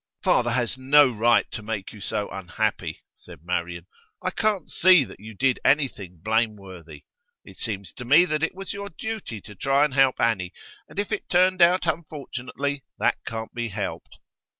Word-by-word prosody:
'Father 120 -1 +3
has 120 +1 -1
no 140 +2 +6
right 115 +1 +3
to 110 - -5
make 105 -2 -5
you 105 - -12
so 105 0 -2
unhappy,' 95 -3 -3
said 75 - -14
Marian. 85 -1 -3 0.4
'I - - 0
can't 210 -6 0
see 185 -4 +5
that - - -12
you 110 +1 -10
did 130 +3 +1
anything 100 - +1
blameworthy; 100 -8 -2 0.4
it - - -14
seems 100 -5 -4
to 125 - -8
me 150 +8 +6
that 155 -3 -1
it 160 - -1
was 195 0 -6
your 200 0 -6
duty 210 - -6
to 105 - -12
try 135 +6 +2
and 150 - -3
help 135 -1 +3
Annie, 95 -6 +1 0.4
and - - -15
if 205 +1 -2
it 210 - -3
turned 185 +1 +3
out 175 +2 +5
unfortunately, 145 -3 -3
that - - +1
can't 110 0 -5
be 120 -1 -3
helped. 100 -2 -5
125 Hz, 175 wpm, -25 LUFS, 105-155 Hz, 0.4 s, no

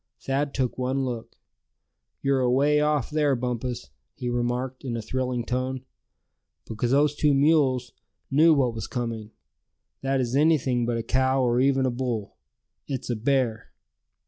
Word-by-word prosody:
Thad 140 +1 -2
took 130 -1 -1
one 130 +1 0
look. 120 -3 -5 0.9
"You're 135 -1 +2
away 135 +4 +3
off 150 -3 +1
there, 150 -2 +2
Bumpus," 125 - -4 0.2
he 125 - -4
remarked, 125 +2 -2
in 120 -3 -3
a - - -3
thrilling 125 0 -2
tone; 130 +1 -2 0.8
"because 115 +2 -2
those 145 +3 +3
two 150 0 +2
wise 135 - +3
mules 135 -5 +3 0.4
knew 155 +4 +6
what 130 -4 +1
was 110 -2 -5
coming. 115 -3 -4 0.7
That 135 0 0
is 125 0 -1
anything 135 -5 +2
but 120 -1 0
a 115 - -3
cow 130 +2 +2
or 120 0 +2
even 135 0 +3
a 130 - +1
bull. 120 -4 -3 0.5
It's 130 -2 -3
a - - 0
bear!" 120 -1 0
130 Hz, 155 wpm, -25 LUFS, 120-135 Hz, 0.9 s, knew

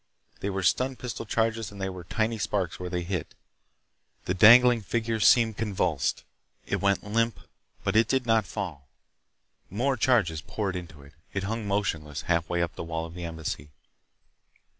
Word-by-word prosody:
They 100 - -2
were 95 -1 -2
stun 130 +8 +2
pistol 120 -3 -6
charges 115 -1 0
and 100 - -11
there 95 0 -2
were 90 -1 -8
tiny 110 +4 -1
sparks 95 -4 -1
where 90 0 -4
they 90 -1 -2
hit. 90 -3 -4 0.9
The 90 - 0
dangling 120 +4 +7
figure 115 +2 -1
seemed 110 0 +5
convulsed. 90 -10 -1 0.4
It - - -2
went 100 -1 +2
limp, 115 +2 0 0.4
but - - -1
it 110 0 +5
did 130 0 +1
not 110 -4 +2
fall. 80 -9 -5 0.8
More 130 +7 0
charges 100 -11 +2
poured 95 +2 -3
into 80 -5 -8
it. 70 +1 -16 0.2
It 95 - -1
hung 110 +1 -3
motionless 80 -8 -2
halfway 85 0 0
up 85 0 -3
the - - -6
wall 80 0 -3
of 85 - -10
the 90 0 -6
Embassy. 80 -3 -5
100 Hz, 165 wpm, -27 LUFS, 85-115 Hz, 0.9 s, dangling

